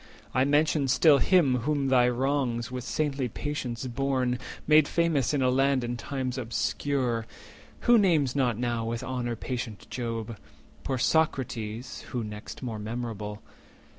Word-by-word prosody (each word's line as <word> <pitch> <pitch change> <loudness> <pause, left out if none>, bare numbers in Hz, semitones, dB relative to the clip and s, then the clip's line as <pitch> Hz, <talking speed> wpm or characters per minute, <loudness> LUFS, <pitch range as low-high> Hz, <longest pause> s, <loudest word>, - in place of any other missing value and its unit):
I 130 +1 +3
mention 145 0 +2
still 140 +2 +5
Him 165 -9 +4
whom 140 +1 0
thy 125 -2 +5
wrongs, 125 -1 -1
with 125 -1 -4
saintly 140 -2 -1
patience 130 -2 -4
borne, 130 -1 0 0.3
Made 155 -1 +6
famous 165 -7 +1
in 145 -3 +1
a 130 - +3
land 135 0 +2
and 120 0 -3
times 130 +4 -3
obscure; 120 0 -1 0.5
Who 240 -1 +6
names 155 -10 +2
not 125 -5 +1
now 120 -1 -1
with 115 +1 -3
honour 125 -2 -2
patient 120 -2 -5
Job? 115 -2 -4 0.5
Poor 135 -1 -1
Socrates, 125 -5 -1
(who 120 -2 -2
next 105 +4 -8
more 115 -4 -4
memorable?) 110 -2 -5
125 Hz, 140 wpm, -28 LUFS, 120-140 Hz, 0.5 s, Made